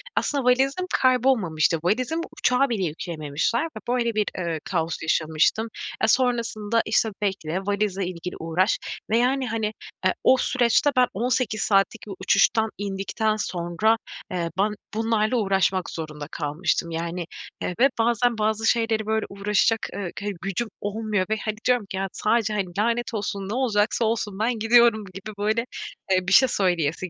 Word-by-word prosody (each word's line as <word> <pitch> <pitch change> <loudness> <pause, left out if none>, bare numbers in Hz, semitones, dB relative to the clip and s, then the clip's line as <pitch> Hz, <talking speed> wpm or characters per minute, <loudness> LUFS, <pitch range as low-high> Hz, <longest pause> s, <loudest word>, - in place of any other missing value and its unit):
aslında 280 -2 0
valizim 270 +8 +2
kaybolmamıştı. 230 -12 +3
Valizimi 255 - 0 0.2
uçağa 250 +2 +3
bile 210 -5 -1
yükleyememişler 165 - -2
ve 330 - -8
böyle 235 -2 0
bir, 210 -1 +2
eee, 170 -3 -2
kaos 165 -3 -1
yaşamıştım. 160 +7 +1 0.4
E, 220 - +5
sonrasında, 230 -3 +1
işte, 220 - +2
bekle, 190 -4 -1
valizle 200 -1 -1
ilgili 180 0 -6
uğraş 170 +5 +1 0.3
ve 225 - +3
yani, 255 +2 +1
hani, 220 -1 -1 0.3
ııı, 185 - +4
o 260 - +6
süreçte 250 +4 +2
ben 250 -1 +6
18 240 0 0
saatlik 205 +2 +1
bir 200 - -5
uçuştan 215 +3 +3
indikten 205 +2 -1
sonra, 185 +3 0 0.3
eee, 170 -2 -1
ben 210 +2 +3 0.2
bunlarla 225 +1 +1
uğraşmak 195 -3 +1
zorunda 150 -2 -6
kalmıştım. 165 +3 -1
Yani 170 +1 -3 0.4
ve 240 +10 +2
bazen 235 0 +2
bazı 220 +1 0
şeyleri 225 -2 +1
böyle 220 0 0
uğraşacak, 205 +3 +1 0.2
ııı, 190 -4 -3
ke 205 - -5
gücüm 195 +5 -2
olmuyor 205 -1 -1
ve 220 - +1
hani 215 - -1
diyorum 245 -4 +2
ki; 190 - -6
ya, 195 - -1
sadece, 215 -1 +1
hani, 205 -2 0
"Lanet 235 +2 0
olsun, 200 -2 -3
ne - - -2
olacaksa 230 -2 +1
olsun, 215 -3 -2
ben 225 +1 0
gidiyorum." 225 -1 +5
gibi 195 +3 -8
böyle, 215 +3 0 0.5
eee, 185 -1 +2
bir 190 - +2
şey 260 - +7
söyleyesi 175 -3 0
215 Hz, 155 wpm, -24 LUFS, 185-230 Hz, 0.5 s, şey